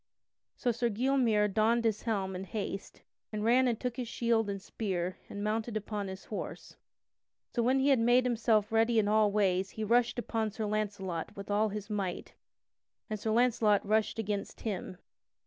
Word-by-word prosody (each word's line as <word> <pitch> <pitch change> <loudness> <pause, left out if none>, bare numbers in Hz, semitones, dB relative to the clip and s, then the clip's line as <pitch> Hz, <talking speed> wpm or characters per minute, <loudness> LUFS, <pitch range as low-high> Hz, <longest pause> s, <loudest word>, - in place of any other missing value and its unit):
So 245 - 0
Sir 235 +1 0
Gylmere 230 -2 +2
donned 225 +3 +2
his 215 -2 +1
helm 195 -5 -1
in 185 +1 -5
haste 200 -1 -5 0.3
and 210 -1 -3
ran 250 +3 +4
and 235 -3 0
took 250 -2 -3
his 250 -2 -3
shield 230 -2 +1
and 200 0 -3
spear 185 -3 -3
and 205 - -5
mounted 220 +1 -1
upon 210 -1 -4
his 190 0 -8
horse. 210 - -6 0.8
So 240 - +1
when 255 +3 +3
he 270 +1 +3
had 270 -3 +5
made 240 +2 +4
himself 225 -3 +2
ready 225 +1 +3
in 210 -2 +3
all 210 0 +4
ways 190 -2 +1
he 220 - -2
rushed 240 +3 +2
upon 225 -2 -1
Sir 215 +1 -4
Launcelot 200 -6 -3
with 200 +1 -6
all 210 +1 +2
his 205 0 -5
might 200 -4 -3 0.8
and 215 - -2
Sir 220 - -2
Launcelot 225 -3 +3
rushed 215 +2 +1
against 205 -2 -3
him. 190 -4 -4
215 Hz, 180 wpm, -31 LUFS, 205-235 Hz, 0.8 s, had